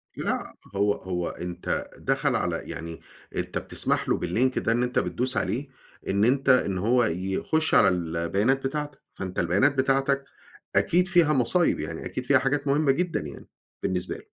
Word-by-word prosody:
لأ -, -, -3 dB, 0.2 s
هو 100 Hz, +1 st, +3 dB
هو 90 Hz, -2 st, -3 dB
أنت 90 Hz, 0 st, -4 dB
دخل 135 Hz, -1 st, 0 dB
على 85 Hz, -6 st, -1 dB
يعني 85 Hz, 0 st, -7 dB, 0.3 s
أنت -, -, -2 dB
بتسمح -, -, 0 dB
له -, -, +2 dB
بالlink 130 Hz, +2 st, +1 dB
ده 115 Hz, -, 0 dB
إن 120 Hz, +2 st, +2 dB
أنت 125 Hz, 0 st, +1 dB
بتدوس 130 Hz, +1 st, -1 dB
عليه 125 Hz, +9 st, -1 dB, 0.4 s
إن 100 Hz, +2 st, +2 dB
أنت 135 Hz, +2 st, +2 dB
إن 100 Hz, -7 st, +4 dB
هو 120 Hz, +6 st, +3 dB
يخش 95 Hz, -, -1 dB
على -, -, +7 dB
البيانات 90 Hz, +9 st, 0 dB
بتاعتك. 150 Hz, 0 st, -5 dB
فأنت 95 Hz, -1 st, -5 dB
البيانات 100 Hz, -, +3 dB
بتاعتك 135 Hz, +1 st, +2 dB, 0.5 s
أكيد 180 Hz, +2 st, +3 dB
فيها 170 Hz, -4 st, +4 dB
مصايب. 135 Hz, +7 st, +2 dB
يعني -, -, -5 dB
أكيد 130 Hz, -, -5 dB
فيها 135 Hz, 0 st, +5 dB
حاجات 140 Hz, +2 st, -1 dB
مهمة 140 Hz, 0 st, +3 dB
جدًا 175 Hz, +4 st, 0 dB
يعني 75 Hz, -3 st, -9 dB, 0.4 s
بالنسبة 90 Hz, -1 st, -2 dB
له. -, -, -8 dB
125 Hz, 165 wpm, -26 LUFS, 95-140 Hz, 0.5 s, على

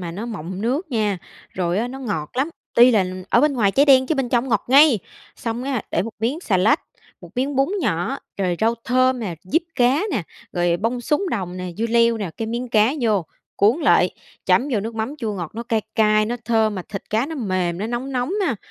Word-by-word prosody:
mà 170 Hz, -2 st, -5 dB
nó 205 Hz, +7 st, -6 dB
mọng 190 Hz, -4 st, -6 dB
nước 280 Hz, +7 st, -1 dB
nha, 210 Hz, -5 st, 0 dB, 0.3 s
rồi 180 Hz, +1 st, -1 dB
á, 235 Hz, -, -1 dB
nó 265 Hz, +2 st, -7 dB
ngọt 185 Hz, -, -3 dB
lắm. 275 Hz, +5 st, +1 dB, 0.3 s
Tuy 245 Hz, +2 st, +7 dB
là 205 Hz, -5 st, +3 dB, 0.3 s
ở -, -, +5 dB
bên 300 Hz, 0 st, +3 dB
ngoài 215 Hz, -7 st, +2 dB
cháy 280 Hz, -, +4 dB
đen 260 Hz, -2 st, +6 dB
chứ 315 Hz, -, +1 dB
bên 270 Hz, -4 st, -1 dB
trong 245 Hz, +2 st, +1 dB
ngọt 215 Hz, -4 st, +1 dB
ngay! 275 Hz, -3 st, +6 dB, 0.4 s
Xong 230 Hz, +1 st, -4 dB
á, 265 Hz, -5 st, -2 dB
để 170 Hz, -, +1 dB
một 225 Hz, -, -5 dB
miếng 265 Hz, +9 st, -1 dB
xà 200 Hz, -, +1 dB
lách, 220 Hz, -, +3 dB, 0.4 s
một -, -, -12 dB
miếng 265 Hz, +2 st, -1 dB
bún 275 Hz, +1 st, +3 dB
nhỏ, 170 Hz, -, -1 dB, 0.2 s
rồi 180 Hz, -3 st, 0 dB
rau 225 Hz, +1 st, +3 dB
thơm 255 Hz, 0 st, +2 dB
nè, 185 Hz, -6 st, -3 dB
diếp 320 Hz, -, +1 dB
cá 255 Hz, +3 st, +3 dB
nè, 215 Hz, -, -1 dB, 0.3 s
rồi 175 Hz, -1 st, +1 dB
bông 230 Hz, +6 st, -1 dB
súng 300 Hz, -, 0 dB
đồng 185 Hz, -4 st, -3 dB
nè, 180 Hz, 0 st, -5 dB
dưa 230 Hz, +2 st, 0 dB
leo 230 Hz, 0 st, +3 dB
nè, 195 Hz, -5 st, -3 dB
cái 225 Hz, -, -3 dB
miếng 240 Hz, +2 st, -3 dB
cá 220 Hz, +3 st, +3 dB
vô, 210 Hz, -7 st, +1 dB, 0.3 s
cuốn 215 Hz, +6 st, +4 dB
lại, -, -, +4 dB, 0.4 s
chấm 270 Hz, +4 st, +3 dB
vô 210 Hz, -, +1 dB
nước 225 Hz, +2 st, -5 dB
mắm 225 Hz, +7 st, -3 dB
chua 220 Hz, -4 st, -2 dB
ngọt. 175 Hz, -5 st, -5 dB
Nó 230 Hz, -, -4 dB
cay 230 Hz, -2 st, 0 dB
cay, 215 Hz, -1 st, +3 dB
nó 240 Hz, +2 st, -2 dB
thơm 220 Hz, -2 st, +2 dB
mà 185 Hz, -, -4 dB
thịt 195 Hz, -, -5 dB
cá 220 Hz, +5 st, +1 dB
nó 320 Hz, -, -6 dB
mềm, 185 Hz, -, -1 dB
nó 210 Hz, -, -2 dB
nóng 245 Hz, +3 st, -4 dB
nóng 250 Hz, +8 st, -1 dB
ha. 250 Hz, -7 st, 0 dB
230 Hz, 235 wpm, -21 LUFS, 200-255 Hz, 0.4 s, Tuy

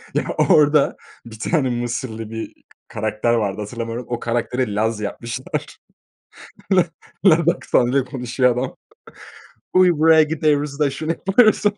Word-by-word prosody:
Ya, -, -, +1 dB, 0.3 s
orada 150 Hz, -1 st, +4 dB, 0.3 s
bir 110 Hz, -2 st, -11 dB
tane 140 Hz, +1 st, 0 dB
Mısırlı 120 Hz, -2 st, -4 dB
bir 115 Hz, 0 st, -6 dB
k -, -, -34 dB, 0.2 s
karakter 110 Hz, +2 st, -1 dB
vardı, 105 Hz, -3 st, -1 dB
hatırlamıyorum, 115 Hz, +2 st, -5 dB
o 120 Hz, -, -2 dB
karakteri 120 Hz, -1 st, -2 dB
Laz 110 Hz, +1 st, 0 dB
yapmışlar. 115 Hz, +4 st, -5 dB, 1.0 s
La 180 Hz, -2 st, +4 dB, 0.4 s
laz 170 Hz, -2 st, +5 dB
aksanıyla 130 Hz, -6 st, +1 dB
konuşuyor 125 Hz, 0 st, 0 dB
adam. 125 Hz, +1 st, -3 dB, 1.0 s
“Uy, 185 Hz, -1 st, +5 dB
buraya 160 Hz, 0 st, +5 dB
gideyruz 150 Hz, -2 st, 0 dB
da” 150 Hz, -2 st, +2 dB
“Şunu 155 Hz, +4 st, -3 dB
yapayruz.” 210 Hz, +7 st, +3 dB
125 Hz, 125 wpm, -20 LUFS, 115-155 Hz, 1.0 s, laz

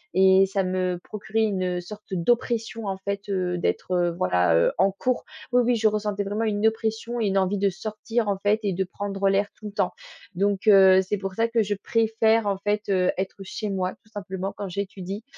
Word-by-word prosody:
et 190 Hz, 0 st, +6 dB
ça 195 Hz, 0 st, 0 dB
me 185 Hz, -1 st, -1 dB
procurait 220 Hz, +1 st, -2 dB
une, 195 Hz, -4 st, 0 dB
heu, -, -, -3 dB
sorte 210 Hz, +4 st, -11 dB
d'oppression, 225 Hz, +3 st, 0 dB
en 195 Hz, -, -2 dB
fait, 200 Hz, +1 st, -4 dB
heu, 180 Hz, -2 st, -1 dB
d'être, 175 Hz, -, -2 dB
heu, 175 Hz, -1 st, +2 dB
voilà, 90 Hz, -2 st, +2 dB
heu, 85 Hz, -, +3 dB
en 190 Hz, +2 st, +3 dB
cours. 250 Hz, +6 st, -1 dB, 0.3 s
Oui, 245 Hz, 0 st, +5 dB
oui 245 Hz, +1 st, +2 dB
je 220 Hz, -1 st, +3 dB
ressentais 210 Hz, -1 st, -1 dB
vraiment 205 Hz, +3 st, -2 dB
une 210 Hz, 0 st, 0 dB
oppression 225 Hz, +2 st, -2 dB
et 210 Hz, -, +1 dB
une 195 Hz, 0 st, +1 dB
envie 190 Hz, +1 st, +1 dB
de 200 Hz, 0 st, +2 dB
sortir, 215 Hz, +3 st, -3 dB
en 200 Hz, -1 st, 0 dB
fait, 205 Hz, +2 st, +2 dB
et 200 Hz, -3 st, 0 dB
de 190 Hz, +2 st, 0 dB
prendre 195 Hz, +1 st, -2 dB
l'air 195 Hz, +1 st, +2 dB
tout 215 Hz, -, -9 dB
le -, -, -7 dB
temps. -, -, 0 dB, 0.4 s
Donc 200 Hz, +2 st, 0 dB
heu, 190 Hz, -2 st, +7 dB
c'est 190 Hz, +2 st, -2 dB
pour 195 Hz, -1 st, -5 dB
ça 230 Hz, +2 st, +2 dB
que 230 Hz, -1 st, +1 dB
je 205 Hz, 0 st, -1 dB
préfère, 225 Hz, +1 st, +1 dB
en 200 Hz, -1 st, 0 dB
fait, 205 Hz, +2 st, -1 dB
heu, 185 Hz, -2 st, +3 dB
être 190 Hz, +1 st, -3 dB
chez 210 Hz, +2 st, -5 dB
moi, 185 Hz, -1 st, -1 dB
tout 215 Hz, -, -25 dB
simplement, 195 Hz, -2 st, -5 dB
quand 200 Hz, -, -4 dB
j'étudie, 195 Hz, +2 st, -5 dB
200 Hz, 220 wpm, -25 LUFS, 190-215 Hz, 0.4 s, heu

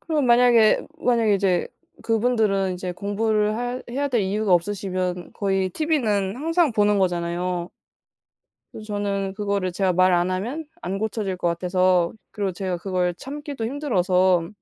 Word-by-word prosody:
그러면 305 Hz, -5 st, 0 dB
만약에 235 Hz, -2 st, +5 dB
만약에 230 Hz, -4 st, +2 dB
이제 185 Hz, -3 st, +1 dB, 0.3 s
그분들은 220 Hz, -5 st, +1 dB
이제 180 Hz, 0 st, -5 dB
공부를 210 Hz, +2 st, 0 dB
할 245 Hz, +1 st, -3 dB
해야 280 Hz, +3 st, -1 dB
될 235 Hz, -6 st, +1 dB
이유가 200 Hz, +1 st, 0 dB
없으시면 185 Hz, -1 st, -2 dB
거의 195 Hz, -2 st, 0 dB
티비는 225 Hz, -, 0 dB
항상 325 Hz, -1 st, +1 dB
보는 210 Hz, -1 st, +3 dB
거잖아요. 175 Hz, 0 st, -1 dB, 1.0 s
그래서 215 Hz, -, -9 dB
저는 200 Hz, -2 st, -2 dB
그거를 200 Hz, -3 st, -1 dB
제가 190 Hz, 0 st, +1 dB
말 185 Hz, +1 st, +4 dB
안 175 Hz, +1 st, +2 dB
하면 235 Hz, +13 st, -3 dB, 0.2 s
안 195 Hz, -, -3 dB
고쳐질 210 Hz, -3 st, -2 dB
것 175 Hz, -, -1 dB
같아서 180 Hz, 0 st, +1 dB, 0.2 s
그리고 200 Hz, -3 st, -2 dB
제가 185 Hz, 0 st, -3 dB
그걸 180 Hz, -1 st, -1 dB
참기도 280 Hz, -, -6 dB
힘들어서 185 Hz, -, +1 dB
200 Hz, 330 characters per minute, -23 LUFS, 185-230 Hz, 1.0 s, 만약에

